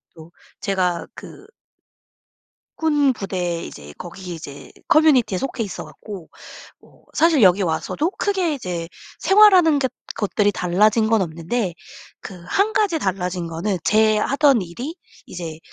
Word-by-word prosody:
또 160 +1 -14 0.3
제가 185 -4 -1
그 395 - -12 1.3
군부대 200 - 0
이제 75 0 -11
거기 180 +1 -8
이제 145 -3 -10 0.2
커뮤니티에 275 -11 +4
속해 255 -1 -3
있어 200 - -6
갖고 195 -7 -10 0.5
뭐 - - -24
사실 325 -4 +3
여기 190 0 +5
와서도 195 - -1
크게 380 -6 -1
이제 180 - -4 0.3
생활하는 370 -5 +6
것 260 -3 -1 0.3
것들이 205 0 +1
달라진 210 +5 +2
건 225 -2 +3
없는데 175 +4 -2 0.5
그 190 - -9
1 415 +3 +1
가지 400 -7 +1
달라진 180 -3 -2
거는 170 +4 -2
제 215 0 +3
하던 275 +1 +3
일이 240 - -6 0.3
이제 165 -3 -7
210 Hz, 250 characters per minute, -21 LUFS, 175-290 Hz, 1.3 s, 생활하는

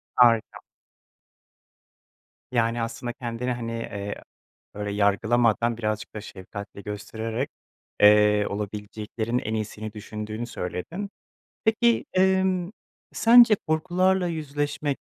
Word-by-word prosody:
Harika. 115 -3 +4 1.9
Yani, 115 -1 +1
aslında 115 +1 -4
kendini, 125 0 -3
hani, 115 -1 -3
eee, 100 -3 -5 0.5
böyle 105 0 -4
yargılamadan 110 +3 +2
birazcık 110 -2 -3
da 110 - -4
şefkatle 100 0 -9
göstererek, 110 +5 -4 0.5
eee, 105 0 +6
olabileceklerin 105 +3 -3
en 110 -2 -3
iyisini 110 0 -4
düşündüğünü 110 +1 -6
söyledin. 145 - -5 0.6
Peki, 230 +1 +3
emm, 190 -1 +2 0.4
sence 230 -1 +7
korkularla 180 +3 +2
yüzleşmek, 145 -2 -2
115 Hz, 90 wpm, -25 LUFS, 105-150 Hz, 1.9 s, sence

